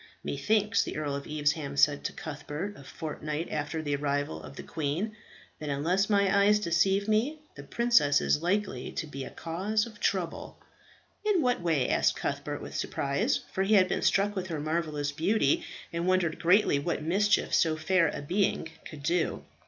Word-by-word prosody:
"Methinks," 210 Hz, +9 st, +1 dB
the -, -, -4 dB
Earl 145 Hz, -2 st, -2 dB
of 140 Hz, -, -6 dB
Evesham 150 Hz, -1 st, -1 dB
said 145 Hz, 0 st, +4 dB
to -, -, -1 dB
Cuthbert, 150 Hz, +5 st, -6 dB
a 140 Hz, -, -12 dB
fortnight 155 Hz, +2 st, -5 dB
after 155 Hz, +1 st, -3 dB
the 145 Hz, -1 st, 0 dB
arrival 145 Hz, +1 st, -2 dB
of -, -, -11 dB
the -, -, -7 dB
queen, 165 Hz, +8 st, -3 dB, 0.4 s
"that 150 Hz, -, -5 dB
unless 175 Hz, +9 st, +1 dB
my 200 Hz, -1 st, +3 dB
eyes 210 Hz, +1 st, +5 dB
deceive 195 Hz, +2 st, +2 dB
me, 225 Hz, +8 st, +1 dB, 0.2 s
the -, -, -9 dB
princess 235 Hz, -13 st, +3 dB
is 150 Hz, -, +1 dB
likely 180 Hz, -7 st, -1 dB
to -, -, -3 dB
be 140 Hz, -3 st, -6 dB
a -, -, -7 dB
cause 200 Hz, +7 st, -1 dB
of 220 Hz, -3 st, -12 dB
trouble." 180 Hz, -4 st, -2 dB, 0.7 s
"In 410 Hz, -7 st, +2 dB
what 245 Hz, -6 st, +1 dB
way?" 160 Hz, -6 st, +1 dB
asked -, -, +2 dB
Cuthbert -, -, -3 dB
with -, -, -8 dB
surprise, 165 Hz, -, 0 dB
for 190 Hz, -, -1 dB
he 205 Hz, +3 st, +3 dB
had 185 Hz, -2 st, +6 dB
been -, -, -1 dB
struck 205 Hz, +1 st, +2 dB
with 185 Hz, -1 st, -3 dB
her 165 Hz, -4 st, -3 dB
marvellous 155 Hz, -2 st, -1 dB
beauty, 210 Hz, -, +1 dB, 0.3 s
and 170 Hz, +1 st, -1 dB
wondered 185 Hz, -3 st, +1 dB
greatly 180 Hz, -4 st, +4 dB
what 145 Hz, -, -2 dB
mischief 200 Hz, +6 st, +2 dB
so 160 Hz, -1 st, +3 dB
fair 175 Hz, +1 st, +3 dB
a 145 Hz, -, -4 dB
being 180 Hz, 0 st, 0 dB, 0.2 s
could 150 Hz, -3 st, -9 dB
do. 170 Hz, +2 st, 0 dB
170 Hz, 180 wpm, -29 LUFS, 150-200 Hz, 0.7 s, had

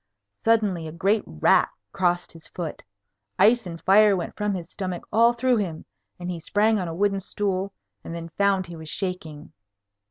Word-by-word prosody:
Suddenly 210 Hz, -7 st, +2 dB
a -, -, -6 dB
great 195 Hz, +6 st, +1 dB
rat 75 Hz, -, +3 dB, 0.2 s
crossed 175 Hz, -2 st, 0 dB
his 165 Hz, -1 st, -12 dB
foot. 165 Hz, 0 st, -6 dB, 0.6 s
Ice 225 Hz, +2 st, +4 dB
and 165 Hz, -1 st, -7 dB
fire 205 Hz, +2 st, +5 dB
went 175 Hz, -, -5 dB
from 210 Hz, -1 st, -1 dB
his 170 Hz, -2 st, -7 dB
stomach 185 Hz, -3 st, -4 dB
all 230 Hz, +2 st, +5 dB
through 245 Hz, +1 st, +1 dB
him, 175 Hz, -7 st, -3 dB, 0.3 s
and 180 Hz, 0 st, -4 dB
he 175 Hz, -, -5 dB
sprang 210 Hz, +6 st, +2 dB
on 180 Hz, -, -2 dB
a 165 Hz, -, -5 dB
wooden 195 Hz, +1 st, +1 dB
stool, 195 Hz, 0 st, -2 dB, 0.3 s
and 165 Hz, -, -6 dB
then 165 Hz, 0 st, -6 dB
found 195 Hz, +2 st, +1 dB
he 170 Hz, -1 st, -9 dB
was 160 Hz, -1 st, -8 dB
shaking. 165 Hz, -6 st, -4 dB
185 Hz, 180 wpm, -25 LUFS, 170-205 Hz, 0.6 s, fire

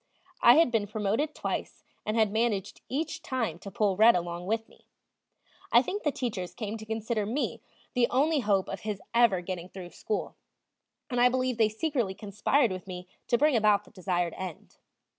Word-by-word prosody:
I -, -, +8 dB
had 325 Hz, -6 st, +5 dB
been 220 Hz, -3 st, +1 dB
promoted 215 Hz, +9 st, -1 dB
twice, -, -, -4 dB, 0.2 s
and 215 Hz, +2 st, 0 dB
had 220 Hz, -2 st, +3 dB
managed 220 Hz, -3 st, -1 dB
each 300 Hz, +4 st, -2 dB
time 230 Hz, -11 st, -2 dB
to 200 Hz, -, -8 dB
pull 200 Hz, 0 st, +1 dB
"Red" 220 Hz, +4 st, +7 dB
along 175 Hz, 0 st, -3 dB
with 225 Hz, +1 st, -1 dB
me. -, -, -23 dB, 0.8 s
I -, -, +6 dB
think 410 Hz, -, -3 dB
the 295 Hz, -, +1 dB
teachers 210 Hz, -10 st, -4 dB
came 215 Hz, -1 st, -4 dB
to 220 Hz, -, -10 dB
consider 220 Hz, 0 st, -1 dB
me 235 Hz, +8 st, -2 dB, 0.3 s
the 245 Hz, -3 st, +3 dB
only 295 Hz, +4 st, +2 dB
hope 200 Hz, -5 st, +1 dB
of 195 Hz, -, -5 dB
his 210 Hz, -3 st, -4 dB
ever 230 Hz, -6 st, +4 dB
getting 180 Hz, 0 st, -5 dB
through 185 Hz, -2 st, -9 dB
school, 210 Hz, -, -4 dB, 0.7 s
and 245 Hz, -1 st, +1 dB
I 250 Hz, -, +7 dB
believe 255 Hz, -1 st, -1 dB
they 220 Hz, -1 st, +5 dB
secretly 225 Hz, -4 st, -1 dB
conspired 215 Hz, +5 st, +1 dB
with 185 Hz, 0 st, -6 dB
me 180 Hz, -1 st, -7 dB, 0.2 s
to 240 Hz, -, +3 dB
bring 295 Hz, +1 st, +3 dB
about 210 Hz, -2 st, +4 dB
the -, -, -19 dB
desired 175 Hz, -2 st, -1 dB
end. 185 Hz, -4 st, -7 dB
215 Hz, 185 wpm, -29 LUFS, 190-245 Hz, 0.8 s, I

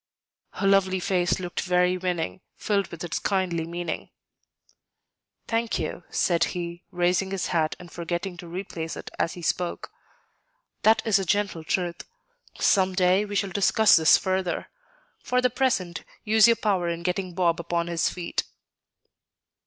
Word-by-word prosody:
Her -, -, -3 dB
lovely 195 Hz, -1 st, +3 dB
face 180 Hz, 0 st, +1 dB
looked 180 Hz, -1 st, -3 dB
very 180 Hz, 0 st, +2 dB
winning, 180 Hz, 0 st, -3 dB
filled 200 Hz, -3 st, 0 dB
with 170 Hz, 0 st, -8 dB
its 170 Hz, -, -2 dB
kindly 180 Hz, -5 st, -1 dB
meaning. 170 Hz, -1 st, -4 dB, 1.4 s
"Thank 230 Hz, 0 st, 0 dB
you," 165 Hz, +2 st, -4 dB
said 170 Hz, -2 st, +2 dB
he, 170 Hz, 0 st, -5 dB
raising 180 Hz, +2 st, +1 dB
his 195 Hz, -2 st, -2 dB
hat 160 Hz, -2 st, +1 dB
and 175 Hz, -2 st, -12 dB
forgetting 175 Hz, +2 st, -4 dB
to 175 Hz, -, -9 dB
replace 170 Hz, -2 st, -5 dB
it -, -, -8 dB
as 165 Hz, -, 0 dB
he 175 Hz, -, -9 dB
spoke; 175 Hz, +1 st, -2 dB, 0.9 s
"that 220 Hz, +1 st, +4 dB
is 215 Hz, -3 st, +4 dB
a -, -, -1 dB
gentle 195 Hz, -3 st, 0 dB
truth; 175 Hz, +1 st, -2 dB, 0.6 s
some 190 Hz, -2 st, +3 dB
day 185 Hz, +2 st, +3 dB
we 205 Hz, 0 st, -6 dB
shall 200 Hz, -1 st, 0 dB
discuss 205 Hz, +3 st, +5 dB
this 160 Hz, -1 st, +6 dB
further. 185 Hz, -1 st, -2 dB, 0.5 s
For 250 Hz, -, 0 dB
the 250 Hz, 0 st, +2 dB
present, 190 Hz, -11 st, 0 dB, 0.2 s
use 220 Hz, 0 st, +6 dB
your 230 Hz, -, +5 dB
power 190 Hz, -6 st, 0 dB
in 170 Hz, 0 st, -4 dB
getting 180 Hz, 0 st, -2 dB
Bob 170 Hz, -2 st, +2 dB
upon 170 Hz, 0 st, -1 dB
his 170 Hz, -1 st, 0 dB
feet." 175 Hz, -2 st, -3 dB
180 Hz, 155 wpm, -26 LUFS, 170-195 Hz, 1.4 s, this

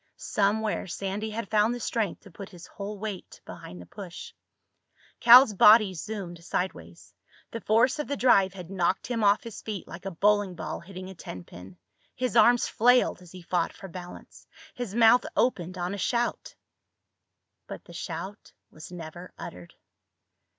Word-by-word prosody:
Somewhere 210 Hz, +1 st, 0 dB
Sandy 195 Hz, +4 st, -4 dB
had 215 Hz, -1 st, -6 dB
found 215 Hz, +2 st, +3 dB
the -, -, -6 dB
strength 225 Hz, -2 st, -2 dB
to 200 Hz, -, -16 dB
put 195 Hz, +3 st, -10 dB
his 175 Hz, -2 st, -12 dB
whole 205 Hz, +1 st, -7 dB
weight 200 Hz, -2 st, -7 dB
behind 90 Hz, -, -10 dB
the 90 Hz, -, -11 dB
push. 190 Hz, -, -10 dB, 0.9 s
Cal's 240 Hz, -1 st, +8 dB
body 210 Hz, 0 st, +6 dB
zoomed 180 Hz, -2 st, -7 dB
sideways. 85 Hz, -, -5 dB, 0.4 s
The 230 Hz, -, -6 dB
force 240 Hz, +7 st, +2 dB
of 295 Hz, -, -3 dB
the 285 Hz, -, -3 dB
drive 200 Hz, -7 st, +4 dB
had 180 Hz, -1 st, -10 dB
knocked 185 Hz, -1 st, 0 dB
him 230 Hz, -2 st, -2 dB
off 200 Hz, 0 st, +4 dB
his 230 Hz, -3 st, -9 dB
feet 210 Hz, -4 st, -6 dB
like 180 Hz, +3 st, -10 dB
a -, -, -1 dB
bowling 205 Hz, +1 st, +1 dB
ball 160 Hz, -2 st, -5 dB
hitting 185 Hz, +1 st, -10 dB
a -, -, -9 dB
tenpin. 90 Hz, -, -11 dB, 0.4 s
His 250 Hz, -4 st, -2 dB
arms 240 Hz, 0 st, +5 dB
flailed 245 Hz, -4 st, +3 dB
as 180 Hz, -2 st, -15 dB
he 185 Hz, -1 st, -11 dB
fought 170 Hz, -1 st, -1 dB
for 195 Hz, -, -10 dB
balance. 180 Hz, 0 st, -11 dB, 0.3 s
His 240 Hz, -5 st, -6 dB
mouth 235 Hz, +1 st, +6 dB
opened 185 Hz, -7 st, 0 dB
on 180 Hz, +2 st, -3 dB
a 200 Hz, -, -5 dB
shout. 240 Hz, +2 st, -2 dB, 1.1 s
But -, -, -8 dB
the -, -, -13 dB
shout 200 Hz, +2 st, -7 dB, 0.2 s
was 155 Hz, +3 st, -12 dB
never 175 Hz, +1 st, -9 dB
uttered. 90 Hz, -1 st, -10 dB
200 Hz, 165 wpm, -27 LUFS, 175-220 Hz, 1.1 s, Cal's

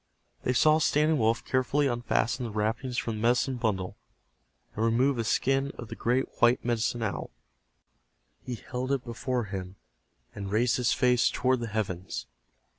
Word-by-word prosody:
They 125 Hz, -, 0 dB
saw 155 Hz, +5 st, +5 dB
Standing 150 Hz, 0 st, +2 dB
Wolf 115 Hz, +1 st, +1 dB
carefully 135 Hz, +3 st, +1 dB
unfasten 120 Hz, 0 st, 0 dB
the 115 Hz, -, -5 dB
wrappings 115 Hz, +4 st, -2 dB
from 115 Hz, -2 st, -2 dB
the -, -, -5 dB
medicine 125 Hz, +2 st, +2 dB
bundle, 95 Hz, -6 st, -2 dB, 0.8 s
and 110 Hz, -, -1 dB
remove 120 Hz, +3 st, +2 dB
a -, -, +1 dB
skin 135 Hz, +4 st, +1 dB
of 120 Hz, -, -8 dB
the -, -, -6 dB
great 125 Hz, +3 st, +1 dB
white 120 Hz, +1 st, +4 dB
Medicine 120 Hz, 0 st, 0 dB
Owl. 110 Hz, -, -3 dB, 1.1 s
He 125 Hz, -, -4 dB
held 125 Hz, +3 st, -4 dB
it 135 Hz, -2 st, 0 dB
before 125 Hz, 0 st, -2 dB
him, 95 Hz, -2 st, -6 dB, 0.6 s
and 100 Hz, -1 st, -6 dB
raised 120 Hz, +4 st, +2 dB
his 125 Hz, -1 st, +1 dB
face 125 Hz, -1 st, +3 dB
toward 130 Hz, 0 st, +1 dB
the 120 Hz, -, -3 dB
heavens. 95 Hz, -, -3 dB
120 Hz, 160 wpm, -28 LUFS, 110-130 Hz, 1.1 s, saw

